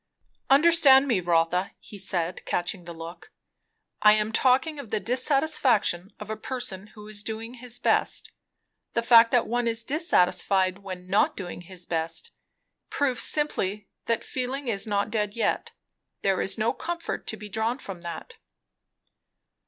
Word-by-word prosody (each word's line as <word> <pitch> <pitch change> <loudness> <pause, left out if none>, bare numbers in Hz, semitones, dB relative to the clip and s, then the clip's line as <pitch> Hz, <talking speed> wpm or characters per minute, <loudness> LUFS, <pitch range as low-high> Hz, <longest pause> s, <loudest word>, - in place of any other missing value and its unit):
"Understand 280 -2 +6
me, 235 -8 +2
Rotha," 175 +1 +1
he 205 - -11
said, 180 -2 -2
catching 175 0 -2
the 170 - -7
look. 165 +1 -10 0.7
"I 210 0 +7
am 215 0 0
talking 265 +6 +2
of 245 - -8
the 215 - 0
dissatisfaction 250 - +1
of 210 0 -7
a - - -2
person 215 -4 -4
who 210 -1 -11
is 210 -1 -5
doing 225 +2 -5
his 245 -1 -6
best. - - 0 0.6
The 235 - +1
fact 230 -1 +7
that 245 -1 +2
one 240 0 -1
is 230 0 -1
dissatisfied 190 - +2
when 185 -2 -8
not 195 +3 +2
doing 175 -2 -6
his 175 0 -8
best, 165 -1 -3 0.6
proves 270 -3 0
simply 210 -9 -1 0.2
that 230 -1 0
feeling 260 +2 -4
is 200 -1 0
not 205 0 -1
dead 210 -2 -1
yet. 230 - -1 0.5
There 195 -1 +2
is 195 - -1
no 225 +2 +1
comfort 340 +4 -5
to 220 - -3
be 210 0 -9
drawn 220 +4 -1
from 195 -9 -8
that." 170 -2 -8
215 Hz, 150 wpm, -26 LUFS, 185-250 Hz, 0.7 s, I